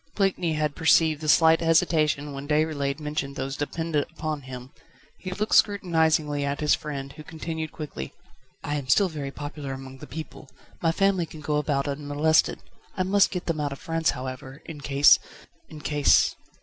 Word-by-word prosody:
Blakeney 190 -4 +1
had 150 -1 -1
perceived 160 -1 +3
the 155 - -2
slight 160 +3 +5
hesitation 155 -3 +2
when 140 +1 -7
Déroulède 150 -2 0
mentioned 150 -2 -3
those 135 +1 -3
dependent 150 0 -2
upon 155 -2 -4
him. 130 0 -9 0.5
He 185 - -6
looked 210 +4 -2
scrutinisingly 160 -7 +2
at 140 +1 -2
his 150 -1 +3
friend, 140 -2 -4
who 155 +1 -11
continued 160 -1 -5
quickly: 145 - -7 0.5
"I 145 0 -2
am 140 -3 -6
still 185 +9 +4
very 145 -4 -5
popular 145 -1 -6
among 135 0 -9
the - - -10
people. 155 -1 -9 0.3
My 165 - +3
family 190 -1 +1
can 155 0 -11
go 150 0 -1
about 145 -1 0
unmolested. 145 +2 +1 0.3
I 185 - +2
must 195 +2 +4
get 180 -2 -4
them 165 -2 -2
out 145 -1 -1
of - - -9
France, 165 0 -1
however, 130 +2 -7
in 150 -3 -8
case 140 0 +6 0.5
in 155 -1 -10
case 145 -1 +3
150 Hz, 175 wpm, -25 LUFS, 140-160 Hz, 0.5 s, case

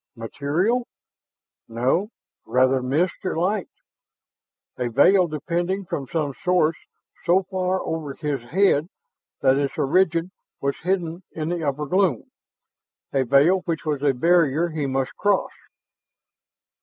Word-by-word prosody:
Material? 155 - -1 0.8
No, 130 - 0 0.3
rather 130 +1 +2
mist 150 +8 -1
or 185 - -2
light. 185 +4 0 1.1
A 125 - 0
veil 180 - +5
depending 175 +5 -2
from 140 -6 -4
some 150 -2 -2
source 175 -4 +2 0.5
so 180 +2 +3
far 185 0 -1
over 155 -4 -4
his 145 -4 -3
head 170 -3 +3 0.5
that 135 0 +4
its 140 -1 -2
origin 170 +3 +2 0.3
was 140 0 -2
hidden 175 -1 -2
in 155 0 -3
the 175 -1 -2
upper 145 +1 -1
gloom, 180 - 0 0.8
a 135 - +2
veil 140 +9 +4
which 165 -2 -3
was 150 -3 -1
a 140 -2 +2
barrier 165 +2 +3
he 155 -3 -2
must 135 -1 -2
cross. 205 -1 +1
160 Hz, 125 wpm, -23 LUFS, 140-180 Hz, 1.1 s, veil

